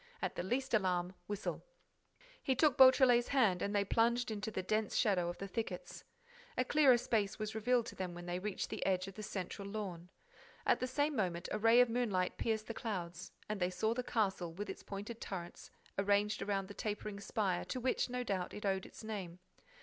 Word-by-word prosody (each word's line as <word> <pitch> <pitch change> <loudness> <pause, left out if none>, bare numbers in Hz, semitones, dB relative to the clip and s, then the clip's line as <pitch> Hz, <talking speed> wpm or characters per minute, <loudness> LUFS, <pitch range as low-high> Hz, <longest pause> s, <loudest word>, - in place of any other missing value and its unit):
At - - -2
the - - -3
least 250 +8 -1
alarm, 180 -3 +1
whistle." 205 0 -3 0.8
He 265 - +1
took 275 +1 +4
Beautrelet's 260 -2 +7
hand 220 -10 +3
and 200 +1 -1
they 200 0 +3
plunged 235 +3 +2
into 210 0 -3
the 190 -3 -3
dense 215 +3 0
shadow 185 -7 +2
of 175 - -5
the 195 - -5
thickets. 195 -2 -5 0.5
A 255 - +2
clearer 275 -3 +6
space 215 -4 0
was 215 0 -3
revealed 235 +2 +2
to - - -8
them 180 -2 -4
when 175 0 -8
they 175 0 -2
reached 200 0 -3
the - - -3
edge 185 0 +1
of 195 - -7
the 215 - -8
central 195 0 -5
lawn. 190 -5 -5 0.6
At - - +4
the 255 - -1
same 290 +3 0
moment 180 -6 -1
a 215 - -1
ray 225 +3 +7
of 250 - +5
moonlight 210 -7 0
pierced 220 -1 0
the 230 - -5
clouds; 180 -7 -4 0.2
and 215 -1 -3
they 180 -1 +2
saw 220 +4 0
the 250 - -1
castle, 195 -8 0
with 200 +5 -5
its - - -10
pointed 205 +3 -7
turrets 175 -3 -6 0.3
arranged 205 +1 +2
around 195 -1 -1
the 205 - -8
tapering 210 -1 -4
spire 195 -3 -1
to 255 - -3
which, 255 +1 0
no 250 0 -2
doubt, 190 -6 -2
it 210 - -6
owed 190 -1 0
its - - -12
name. 195 -6 -5
210 Hz, 205 wpm, -35 LUFS, 185-235 Hz, 0.8 s, Beautrelet's